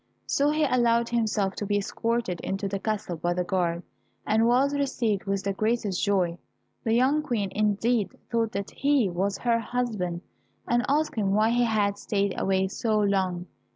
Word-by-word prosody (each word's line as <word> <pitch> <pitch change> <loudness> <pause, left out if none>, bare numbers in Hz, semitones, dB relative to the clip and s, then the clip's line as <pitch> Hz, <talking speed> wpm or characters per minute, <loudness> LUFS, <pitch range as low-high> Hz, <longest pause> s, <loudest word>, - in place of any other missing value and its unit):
So 285 +1 +2
he 305 +1 +1
allowed 235 -3 +2
himself 215 -4 0
to 205 - -3
be 205 0 +1
escorted 215 -2 -2
into 195 +1 -2
the 195 0 -3
castle 200 -5 -3
by 175 +2 -1
the 180 - 0
guard, 175 -2 -1 0.4
and 220 +2 +3
was 265 +4 +3
received 250 -8 -1
with 195 -1 -1
the 200 - -1
greatest 215 -2 -1
joy. 185 -4 +1 0.4
The 225 0 +1
young 265 +5 +3
Queen 230 -10 -2
indeed 215 +1 0
thought 230 -2 +1
that 200 0 -4
he 275 -9 +2
was 195 +3 -1
her 235 -1 +1
husband, 215 -8 -2 0.5
and 240 0 +2
asked 305 +3 +1
him 200 -3 0
why 215 +2 +3
he 240 0 +3
had 205 -3 +1
stayed 200 -2 0
away 190 0 +1
so 215 +2 0
long. 190 -3 0
210 Hz, 175 wpm, -26 LUFS, 195-235 Hz, 0.5 s, and